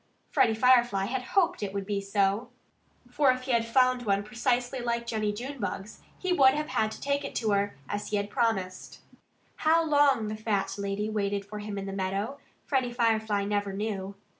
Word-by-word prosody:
Freddie 225 - +3
Firefly 240 -4 +4
had 255 +5 -2 0.2
hoped 360 -2 +3
that 205 - -2
it 195 - -10
would 200 -1 -2
be 200 0 -1
so. 200 +2 0 0.6
For 275 +2 +3
if 255 0 -3
he 260 - -3
had 230 -1 +2
found 255 +1 +3
one 200 -3 +1
precisely 245 +4 -1
like 235 -1 -2
Jennie 215 -3 -1
Junebug's, 225 -3 -5 0.2
he 370 -1 0
would 265 -5 +6
have 300 +1 -2
had 215 - +1
to - - -10
take 280 +1 -1
it - - -6
to 220 -3 0
her, 200 0 +1
as 205 0 -3
he 210 - 0
had 200 0 -3
promised. 195 -6 -2 0.6
How 325 +1 +3
long 285 -7 +3
the 215 - -3
fat 210 -3 -1
lady 200 +1 -2
waited 200 -2 -1
for 210 +1 -7
him 205 -1 -5
in 195 - -4
the 195 - -5
meadow, 195 +7 -2 0.3
Freddie 260 -3 0
Firefly 220 -4 +1
never 205 -1 -1
knew. 200 -1 -3
220 Hz, 195 wpm, -28 LUFS, 200-255 Hz, 0.6 s, would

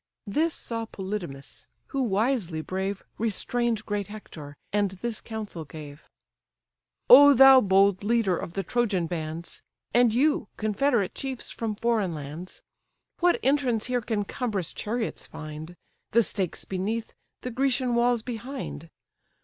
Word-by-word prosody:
This 310 +10 0
saw 230 -1 -4
Polydamas; 185 -10 -6 0.2
who, 275 - -1
wisely 210 -7 0
brave, 190 +3 -3 0.2
Restrain'd 230 +1 -1
great 205 -2 -2
Hector, 160 -9 -10 0.2
and 205 -1 +2
this 235 -2 -3
counsel 215 -7 -6
gave: 150 0 -11 1.0
"O 285 +2 +10
thou, 265 +1 +9
bold 195 -1 +3
leader 220 -4 +2
of 170 - -5
the 195 - -2
Trojan 205 -4 0
bands! 165 0 -5 0.3
And 240 -1 +5
you, 265 0 +2
confederate 220 -1 +1
chiefs 265 -2 -5
from 220 -2 -3
foreign 215 -6 0
lands! 150 +5 -8 0.6
What 350 0 +3
entrance 255 -5 +2
here 250 -1 0
can 215 -2 -1
cumbrous 205 - -3
chariots 225 +1 -3
find, 155 +2 -8 0.4
The 235 +1 +6
stakes 190 -5 -2
beneath, 210 +5 -3 0.3
the 250 - -4
Grecian 255 0 +1
walls 235 -1 +2
behind? 240 - -6
215 Hz, 130 wpm, -27 LUFS, 185-245 Hz, 1.0 s, O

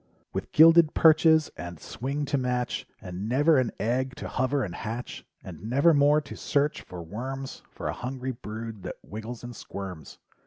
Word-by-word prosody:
With - - -4
gilded 165 0 +7
perches 160 -1 +5
and 85 -2 -7
swing 140 +4 -3
to 145 0 0
match, 125 -1 -2
And 95 +3 -5
never 145 +4 +4
an 125 -3 0
egg 125 +3 0
to - - -6
hover 130 +1 0
and 90 - -4
hatch. 115 +3 -5 0.2
And 95 +4 -8
nevermore 145 +2 +5
to 140 - -9
search 145 +1 0
for 90 -2 -9
worms 130 +9 -6
For - - -6
a - - -1
hungry 130 +1 -4
brood 110 -2 -7
that - - -6
wriggles 110 +3 -7
and 120 0 -7
squirms. 95 -8 -8
125 Hz, 165 wpm, -27 LUFS, 110-145 Hz, 0.2 s, gilded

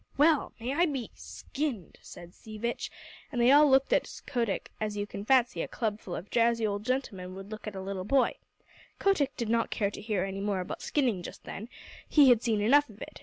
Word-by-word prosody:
"Well! 300 +1 +4
May 245 +4 -2
I 345 +4 +3
be 265 -7 -4
skinned!" 175 - -5
said 175 0 -12
Sea 215 -1 -11
Vitch, 235 +2 -3 0.4
and 250 - -2
they 240 +2 +6
all 295 +1 +7
looked 265 0 +4
at - - +2 0.2
Kotick 235 -6 -2
as 210 -1 -2
you 205 - -1
can 200 -1 -7
fancy 255 0 +3
a - - -3
club 215 -3 -2
full 180 - -6
of 180 - -8
drowsy 230 -1 +3
old 205 -1 -2
gentlemen 195 -8 -3
would 195 +2 -9
look 215 0 -7
at 210 - -5
a 190 - -5
little 190 -1 -4
boy. 265 +6 +3 0.6
Kotick 310 -9 +1
did 235 - -2
not 230 +1 +1
care 200 -2 -1
to - - -8
hear 210 -3 -1
any 195 0 -4
more 200 -2 0
about 180 - -6
skinning 245 -11 0
just - - -9
then; 220 +4 -7 0.4
he 290 -3 +7
had 240 -2 +5
seen 220 -4 +1
enough 285 +7 +4
of 210 -1 -15
it. - - -9
225 Hz, 220 wpm, -29 LUFS, 200-265 Hz, 0.6 s, all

